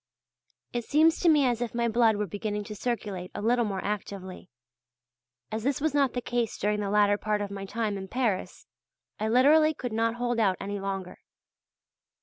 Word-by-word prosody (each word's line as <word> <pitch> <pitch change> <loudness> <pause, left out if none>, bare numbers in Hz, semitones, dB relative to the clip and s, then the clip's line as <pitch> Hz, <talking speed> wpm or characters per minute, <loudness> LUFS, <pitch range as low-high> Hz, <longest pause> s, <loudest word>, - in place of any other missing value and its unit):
It 240 -1 -2
seems 315 +6 +3
to 345 - +4
me 295 -3 +5
as 240 -2 0
if 240 -1 -3
my 235 0 +1
blood 230 -1 +3
were 210 0 -1
beginning 210 +1 -3
to 210 +1 -8
circulate 205 -5 -3
a - - -4
little 240 +1 +2
more 195 -2 -3
actively. 195 -2 -5 1.0
As 220 +1 -2
this 275 +5 0
was 310 0 0
not 280 -3 +2
the 245 - -3
case 240 -3 -1
during 210 +1 0
the 205 -1 -2
latter 205 0 +3
part 210 -1 0
of 205 -1 -4
my 195 0 -5
time 210 -1 -2
in 190 - -7
Paris, 225 -4 -2 0.5
I 215 - -1
literally 300 +7 +5
could 245 -4 -5
not 230 +1 +1
hold 240 -1 -1
out 195 -4 +2
any 200 +1 -4
longer. 195 -2 -5
220 Hz, 190 wpm, -28 LUFS, 205-245 Hz, 1.0 s, me